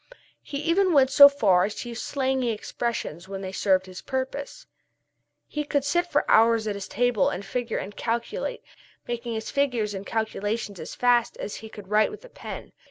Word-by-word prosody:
He 285 - -6
even 360 +3 +3
went 270 -2 +5
so 280 0 +10
far 200 -11 +3
as 210 - -4
to 240 - -6
use 235 0 -5
slangy 265 -3 0
expressions 215 -6 -3
when 195 0 -6
they 190 -1 -5
served 190 -1 +2
his 185 -1 -9
purpose. 280 - -4 0.8
He 300 - -3
could 285 -1 0
sit 345 +5 +1
for 295 -4 +1
hours 225 0 +5
at 210 - -1
his 200 -1 -6
table 245 -3 +2
and 195 +3 -5
figure 235 +2 -2
and 205 +1 -6
calculate, 240 - -3 0.4
making 235 -1 -3
his 220 0 -4
figures 245 -7 0
and 195 0 -5
calculations 215 -2 -3
as 160 - -7
fast 245 -1 +2
as 205 - -5
he 220 - -9
could 205 -3 -11
write 215 +1 +4
with 425 +4 -10
a - - -13
pen. - - -8
235 Hz, 190 wpm, -26 LUFS, 205-280 Hz, 0.8 s, so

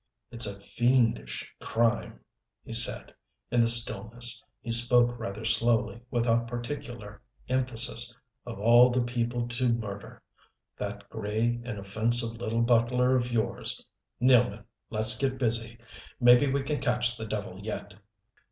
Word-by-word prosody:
"It's 115 -2 +4
a 100 -1 -5
fiendish 115 - -1
crime," 115 0 -1 0.4
he - - -9
said 115 +1 +3 0.4
in 120 0 +3
the 115 - +3
stillness. 115 0 +2 0.2
He 115 - -6
spoke 120 +1 +4
rather 110 -1 -6
slowly, 115 +1 +1
without 120 -1 0
particular 120 -3 -7 0.3
emphasis. 120 -2 0 0.3
"Of 120 -4 -8
all 120 +3 +6
the 125 0 0
people 120 0 -2
to 120 +1 -1
murder 105 -4 -5 0.5
that 100 0 -7
gray, 110 +2 -2
inoffensive 115 +2 -1
little 115 0 -2
butler 125 +2 +2
of 120 -1 -1
yours! 115 -2 -3 0.3
Nealman, 120 -4 +3 0.3
let's 110 0 +4
get 130 -1 -1
busy. 115 -2 -1 0.4
Maybe 125 +2 +5
we 140 0 -1
can 145 +1 -3
catch 125 0 0
the 110 -2 -7
devil 100 -3 -5
yet." 105 -1 -6
120 Hz, 130 wpm, -27 LUFS, 110-120 Hz, 0.5 s, all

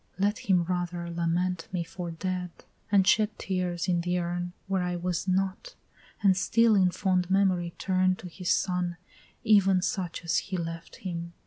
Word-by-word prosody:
let 205 +2 +1
him 180 -3 +2
rather 175 -1 -3
Lament 170 +1 -1 0.2
for 175 +1 -6
me 165 - -7
dead, 185 -1 -2 0.4
and 195 -2 +5
shed 215 0 +3
tears 180 -2 -2
in 175 -2 +2
the 180 +1 0
urn 175 0 -2
Where 190 -1 0
I 180 0 -1
was 175 +1 -2
not, 190 - -1 0.5
and 195 -2 +5
still 230 +4 +3
in 190 -3 +4
fond 185 -1 0
memory 185 -3 +2
turn 185 -1 +2
To 185 - -9
his 180 +1 -5
son 180 -2 +1 0.5
even 195 -4 +4
such 180 -2 -2
as 165 - +2
he 190 -1 -4
left 165 -1 -6
him. 170 -1 -4
180 Hz, 165 wpm, -28 LUFS, 175-190 Hz, 0.5 s, and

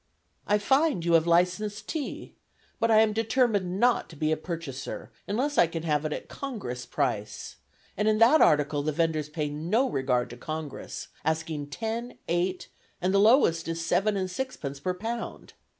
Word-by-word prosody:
"I 210 - +4
find 270 - +2
you 170 - +2
have 165 0 +4
licensed 180 +5 +1
tea, 310 -4 -5 0.5
but 230 - +2
I 220 -1 +6
am 220 -1 +3
determined 220 -5 +1
not 245 +1 +3
to 165 - -12
be 155 +1 0
a - - +3
purchaser 155 -5 -6 0.2
unless 265 +8 0
I 175 - +6
can 165 0 -5
have 150 -2 0
it 155 - -1
at - - -5
Congress 125 - -6
price, 120 -8 -3 0.4
and 210 +2 0
in 215 0 +3
that 235 +8 +6
article 145 -1 +4
the 155 +2 -1
vendors 155 -1 0
pay 150 -1 -2
no 170 - 0
regard 130 - 0
to 120 - -9
Congress, 155 +2 -6
asking 155 -2 -2
ten, 225 +9 -4
eight, 180 +2 -1 0.3
and 185 +2 0
the 200 - +5
lowest 205 - +4
is 165 0 -3
seven 200 +5 +2
and 185 -1 -2
sixpence 180 - -4
per 180 +5 -2
pound. 230 +4 -5
175 Hz, 175 wpm, -27 LUFS, 155-220 Hz, 0.5 s, I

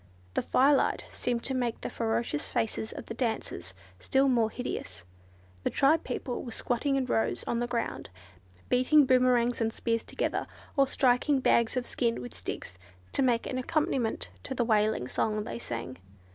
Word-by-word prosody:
The - - +1
firelight 275 +2 +3
seemed 240 -1 -2
to 265 - -1
make 245 -3 -1
the - - -3
ferocious 225 -8 -1
faces 220 0 -1
of - - -7
the - - -6
dancers 220 - -3 0.2
still 270 - +2
more 235 -4 +3
hideous. 95 - -5 0.6
The - - +1
tribe 305 +4 +3
people 250 0 -4
were 240 - -7
squatting 250 +5 0
in 270 -1 +1
rows 225 -3 0
on 235 - -1
the 240 - -1
ground, 235 - -3 0.6
beating 265 +4 +5
boomerangs 250 -2 +3
and 225 0 +1
spears 230 0 -1
together, - - -2 0.3
or 275 -2 +4
striking 265 +2 +3
bags 235 -1 +3
of 250 - -1
skin 235 -2 0
with 120 -5 -7
sticks, 90 0 -6 0.3
to - - 0
make 245 -3 +2
an 255 - -2
accompaniment 260 -4 0
to 265 - -5
the 240 - +1
wailing 215 - +2
song 215 +8 0
they 235 - -5
sang. 120 - -5
240 Hz, 170 wpm, -29 LUFS, 220-255 Hz, 0.6 s, beating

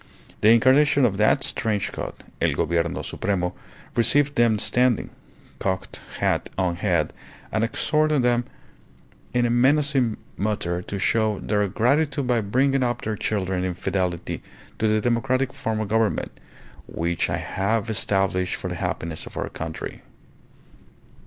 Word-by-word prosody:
The 105 - +6
incarnation 130 +4 +5
of 100 -5 +1
that 110 +6 +3
strange 105 -5 -1
god, - - -5 0.3
El - - +2
Gobierno 85 0 0
Supremo, 90 -3 -1 0.4
received 140 +5 +3
them 115 -4 +3
standing, 125 +2 +2 0.5
cocked 95 -2 -3 0.2
hat - - 0
on 90 -2 0
head, 85 -5 0 0.4
and 110 - +1
exhorted 150 +4 +1
them 120 0 +2 0.9
in 125 -1 +2
a 120 - +1
menacing 135 -1 +3 0.2
mutter 95 -4 -1
to 100 - -5
show 110 +1 +1
their 105 -1 0
gratitude 140 +7 +1
by 120 -2 +2
bringing 135 +6 +2
up 120 -1 -1
their 110 0 -2
children 95 -3 -1
in 90 -1 -2
fidelity 90 -2 -2 0.4
to 110 - +2
the 110 0 +2
democratic 130 +3 +1
form 110 -5 -2
of 110 -2 -3
government, 110 0 +1 0.6
"which 85 0 -1
I - - 0
have 110 +4 -1
established 95 -4 0
for - - -5
the - - -4
happiness 80 -1 -3
of - - -10
our - - -2
country." 80 0 -6
110 Hz, 140 wpm, -24 LUFS, 95-125 Hz, 0.9 s, The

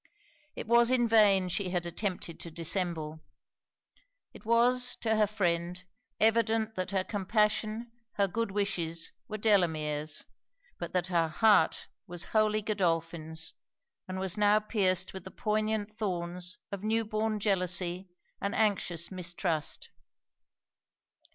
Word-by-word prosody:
It - - -5
was 235 +1 +5
in 250 -2 +3
vain 205 -4 +5
she 185 +1 -2
had 175 -1 -1
attempted 175 -1 -4
to 170 - -6
dissemble. 165 -1 -2 1.1
It - - -14
was, 245 +2 +3
to 220 -1 +1
her 215 -1 +3
friend, 180 -3 -1 0.4
evident, 225 0 +2
that 185 -2 -3
her 190 -1 0
compassion, 215 +3 0 0.2
her 200 -1 +2
good 230 +4 -2
wishes, 175 -5 -2 0.2
were 215 - -5
Delamere's, 155 -8 +1 0.5
but - - -5
that 180 -2 +1
her 165 -1 +3
heart 180 +1 +3 0.2
was 175 0 -4
wholly 215 -1 +2
Godolphin's, 165 -5 0 0.5
and 185 0 -4
was 190 +2 -1
now 210 +1 +5
pierced 190 -4 0
with 190 - -7
the 190 - -8
poignant 215 0 -1
thorns 180 -3 -2
of 200 -2 -5
new 220 +2 0
born 215 0 -1
jealousy 185 -2 0 0.3
and 200 +3 -2
anxious 185 -6 0
mistrust. 175 -4 -2
195 Hz, 125 wpm, -30 LUFS, 175-215 Hz, 1.1 s, was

